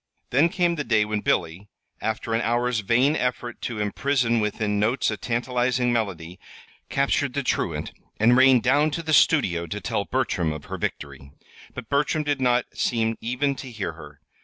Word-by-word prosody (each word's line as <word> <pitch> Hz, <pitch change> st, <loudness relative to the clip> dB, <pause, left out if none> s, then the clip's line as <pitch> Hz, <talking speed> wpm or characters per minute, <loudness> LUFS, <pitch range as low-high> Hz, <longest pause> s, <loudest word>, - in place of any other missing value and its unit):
Then 145 Hz, +7 st, +4 dB
came 175 Hz, -1 st, 0 dB
the 150 Hz, -, -1 dB
day 110 Hz, -5 st, +2 dB
when 105 Hz, 0 st, -2 dB
Billy, 90 Hz, +4 st, -1 dB, 0.3 s
after 110 Hz, +1 st, -2 dB
an 115 Hz, -, +1 dB
hour's 120 Hz, 0 st, 0 dB
vain 125 Hz, +8 st, +2 dB
effort 125 Hz, -3 st, -3 dB
to 115 Hz, -3 st, -4 dB
imprison 120 Hz, +3 st, +1 dB
within 105 Hz, -1 st, -1 dB
notes 115 Hz, +3 st, +1 dB
a -, -, -2 dB
tantalizing 125 Hz, +1 st, 0 dB
melody, 90 Hz, -6 st, -3 dB, 0.5 s
captured 140 Hz, -1 st, 0 dB
the 140 Hz, -, -1 dB
truant -, -, -2 dB, 0.3 s
and 115 Hz, +3 st, +5 dB
rain 130 Hz, -1 st, +6 dB
down 145 Hz, +6 st, +3 dB
to 170 Hz, -, -5 dB
the 160 Hz, -1 st, -1 dB
studio 90 Hz, -, +3 dB
to -, -, -4 dB
tell -, -, -2 dB
Bertram 80 Hz, -3 st, -1 dB
of 75 Hz, -1 st, -9 dB
her -, -, -6 dB
victory. 70 Hz, -1 st, -5 dB, 0.4 s
But 125 Hz, -3 st, -7 dB
Bertram 145 Hz, +3 st, +1 dB
did 145 Hz, -2 st, -1 dB
not 125 Hz, -1 st, +2 dB
seem 115 Hz, -1 st, 0 dB
even 125 Hz, +5 st, 0 dB
to 130 Hz, -, -7 dB
hear 110 Hz, -7 st, -4 dB
her. 75 Hz, -2 st, -13 dB
120 Hz, 175 wpm, -24 LUFS, 105-135 Hz, 0.5 s, rain